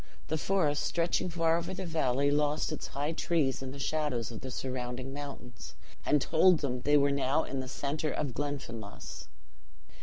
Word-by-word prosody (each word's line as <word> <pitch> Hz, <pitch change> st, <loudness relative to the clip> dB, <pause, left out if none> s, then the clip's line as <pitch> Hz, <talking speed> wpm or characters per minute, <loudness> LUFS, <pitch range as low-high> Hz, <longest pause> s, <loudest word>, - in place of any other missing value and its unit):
The 160 Hz, -, +1 dB
forest, 155 Hz, -6 st, +2 dB
stretching 170 Hz, +1 st, +1 dB
far 165 Hz, -1 st, +2 dB
over 170 Hz, +2 st, -4 dB
the 190 Hz, -, -4 dB
valley, 140 Hz, -4 st, +2 dB
lost 150 Hz, 0 st, +1 dB
its -, -, -4 dB
high 145 Hz, +3 st, -2 dB
trees 160 Hz, -6 st, +1 dB
in 130 Hz, -1 st, -5 dB
the 140 Hz, -, -8 dB
shadows 140 Hz, -5 st, -1 dB
of 115 Hz, -, -7 dB
the 130 Hz, -, -5 dB
surrounding 130 Hz, 0 st, -4 dB
mountains, 140 Hz, -5 st, -8 dB, 0.3 s
and 150 Hz, -, +5 dB
told 165 Hz, +4 st, +5 dB
them 125 Hz, -3 st, -1 dB
they 145 Hz, +3 st, +5 dB
were 140 Hz, 0 st, +4 dB
now 140 Hz, +2 st, +2 dB
in 135 Hz, -, -3 dB
the 130 Hz, -, -4 dB
center 145 Hz, +3 st, -2 dB
of 140 Hz, -4 st, -2 dB
Glenfinlass. 115 Hz, -, -5 dB
145 Hz, 175 wpm, -31 LUFS, 130-155 Hz, 0.3 s, and